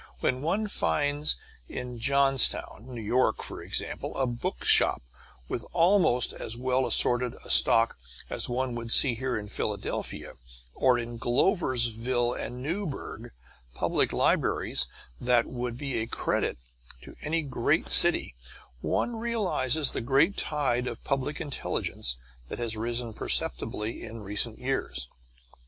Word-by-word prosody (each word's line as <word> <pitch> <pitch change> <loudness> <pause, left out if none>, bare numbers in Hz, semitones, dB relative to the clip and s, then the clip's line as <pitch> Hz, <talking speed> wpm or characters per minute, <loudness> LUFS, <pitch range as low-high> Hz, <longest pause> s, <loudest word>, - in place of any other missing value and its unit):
When 130 0 -1
one 195 +8 -1
finds 145 -7 +1 0.3
in 125 -1 -7
Johnstown, 135 -2 +3
N. 115 -4 -8
Y., 125 +3 +2
for - - -4
instance, - - -2
a 135 - 0
bookshop 120 - +2 0.4
with 115 - -4
almost 170 -8 +3
as 115 - -5
well 130 +1 0
assorted 120 0 +4
a - - -3
stock 115 - +6 0.3
as - - -3
one 125 0 -2
would 115 -1 -5
see 130 0 +8
here 130 +1 -3
in 105 -1 -7
Philadelphia; - - -4 0.4
or 130 -2 +2
in 120 0 -6
Gloversville 120 - +1
and 125 +1 -7
Newburgh 165 0 -5 0.4
public - - 0
libraries - - +1 0.3
that 120 -1 +2
would 120 -1 -5
be 135 -3 -4
a 110 - -4
credit - - -2 0.5
to - - -13
any 160 +2 -2
large 130 - 0
city, - - +6 0.5
one 240 - -2
realizes 180 - +1
the - - -4
great 140 - +2
tide 130 -5 -1
of 120 -2 -7
public 135 +2 -3
intelligence 60 - -2 0.3
that - - -6
has 115 -2 -4
risen 115 +1 -3
perceptibly 105 - -1
in 115 0 -9
recent 105 +3 -2
years. 65 - -3
125 Hz, 130 wpm, -27 LUFS, 115-140 Hz, 0.5 s, see